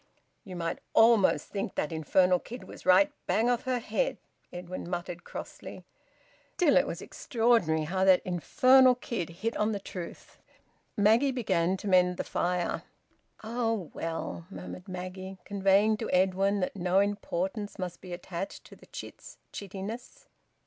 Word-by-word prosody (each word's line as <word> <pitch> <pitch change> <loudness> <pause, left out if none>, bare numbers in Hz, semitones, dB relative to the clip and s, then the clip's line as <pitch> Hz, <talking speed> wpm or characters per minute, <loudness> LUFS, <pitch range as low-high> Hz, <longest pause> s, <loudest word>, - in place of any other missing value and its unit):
"You 190 -5 -9
might 165 -1 -3 0.2
almost 225 -3 +5
think 195 -2 -4
that 150 - -1
infernal 180 +3 +3
kid 245 +7 -9
was - - -12
right 185 +2 +6 0.2
bang 235 +3 +2
off 245 0 -1
her 255 -1 +1
head," - - -1 0.3
Edwin 175 0 -7
muttered 175 0 -4
crossly. - - -9 0.7
(Still, 325 -6 +4
it 275 - +4
was - - -5
extraordinary 225 - +1
how 185 +4 -1
that 185 -1 +5
infernal 255 - +5
kid 230 -8 -4
hit 215 +8 -3
on 210 +1 +1
the 200 - -2
truth.) 180 -3 -9 0.6
Maggie 220 +7 +4
began 190 -7 0
to 205 - -7
mend 180 -1 +4
the - - -2
fire. 175 0 -1 0.6
"Oh, 225 -5 -2
well!" 165 +1 -4
murmured 185 -1 -9
Maggie, 185 +1 -6
conveying 200 +2 +3
to 225 - -4
Edwin 190 +2 +2
that 180 - -2
no 180 0 +1
importance 205 0 -2
must 180 -3 -5
be 185 - -10
attached 175 +1 -6
to - - -14
the - - -19
chit's - - -10 0.2
chittishness. 200 +5 -7
190 Hz, 150 wpm, -29 LUFS, 180-225 Hz, 0.7 s, right